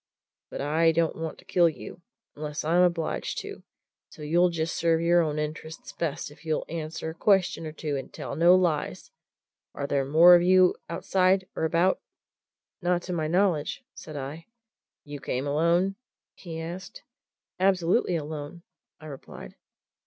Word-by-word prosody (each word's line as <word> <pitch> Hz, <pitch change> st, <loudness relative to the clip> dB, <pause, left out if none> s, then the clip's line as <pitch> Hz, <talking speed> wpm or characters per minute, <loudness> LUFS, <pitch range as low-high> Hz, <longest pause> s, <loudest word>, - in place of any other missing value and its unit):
But -, -, -6 dB
I 160 Hz, +3 st, +3 dB
don't 165 Hz, 0 st, 0 dB
want 160 Hz, -1 st, -5 dB
to -, -, -18 dB
kill 175 Hz, -2 st, +4 dB
you, 165 Hz, +2 st, -10 dB, 0.3 s
unless 150 Hz, 0 st, -5 dB
I'm 170 Hz, +3 st, +3 dB
obliged 170 Hz, -3 st, 0 dB
to, -, -, -9 dB, 0.5 s
so 150 Hz, -, -12 dB
you'll 175 Hz, +4 st, +3 dB
just 165 Hz, -1 st, -2 dB
serve 165 Hz, -1 st, +2 dB
your 170 Hz, +1 st, +4 dB
own 155 Hz, -2 st, -1 dB
interests 155 Hz, +1 st, -5 dB
best 160 Hz, -2 st, -3 dB
if 145 Hz, -, -17 dB
you 155 Hz, -1 st, -1 dB
answer 160 Hz, 0 st, -5 dB
a -, -, -10 dB
question 185 Hz, -2 st, +1 dB
or -, -, -6 dB
two 155 Hz, -2 st, -4 dB
and 135 Hz, -, -7 dB
tell -, -, -6 dB
no 170 Hz, +4 st, +6 dB
lies. 170 Hz, -5 st, -1 dB, 0.6 s
Are 140 Hz, -, -3 dB
there 140 Hz, -1 st, 0 dB
more 160 Hz, +6 st, +7 dB
of 175 Hz, -, +7 dB
you 185 Hz, +1 st, +5 dB
outside 185 Hz, 0 st, +1 dB
or -, -, -1 dB
about?" 170 Hz, +4 st, +2 dB, 0.8 s
"Not 175 Hz, 0 st, 0 dB
to 180 Hz, -, -4 dB
my 160 Hz, -3 st, -1 dB
knowledge!" 180 Hz, -, 0 dB
said 155 Hz, -2 st, -9 dB
I. 145 Hz, +6 st, -7 dB, 0.6 s
"You 145 Hz, -1 st, -8 dB
came 130 Hz, 0 st, -3 dB
alone?" 170 Hz, +6 st, +1 dB, 0.4 s
he 165 Hz, -3 st, -8 dB
asked. 175 Hz, +4 st, -8 dB, 0.6 s
"Absolutely 185 Hz, 0 st, +2 dB
alone," 155 Hz, +1 st, -6 dB, 0.4 s
I 155 Hz, -, -13 dB
replied. 140 Hz, -3 st, -10 dB
165 Hz, 160 wpm, -27 LUFS, 155-175 Hz, 0.8 s, more